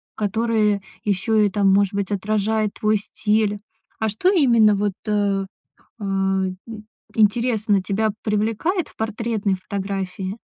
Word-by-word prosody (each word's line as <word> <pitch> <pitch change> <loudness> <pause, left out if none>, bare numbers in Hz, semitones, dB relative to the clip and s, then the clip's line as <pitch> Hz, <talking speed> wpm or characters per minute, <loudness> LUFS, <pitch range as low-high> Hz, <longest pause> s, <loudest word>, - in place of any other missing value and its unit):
которое 215 -1 +1 0.2
ещё 205 +2 0
и 210 -1 +4
там, 195 -1 +2
может 200 0 +3
быть, 200 0 -2
отражает 215 +1 0
твой 215 0 +2
стиль. 210 0 0 0.4
А 220 - 0
что 215 - +1
именно 235 - +5
вот, 205 0 0
э, 200 -2 +1 0.6
а, 195 -1 0
и 185 0 -6 0.5
интересно, 215 -2 +2
тебя 215 +3 0
привлекает 225 - 0
в - - -22
портретной 220 -2 -1
фотографии? 195 0 -4
210 Hz, 125 wpm, -22 LUFS, 195-220 Hz, 0.6 s, именно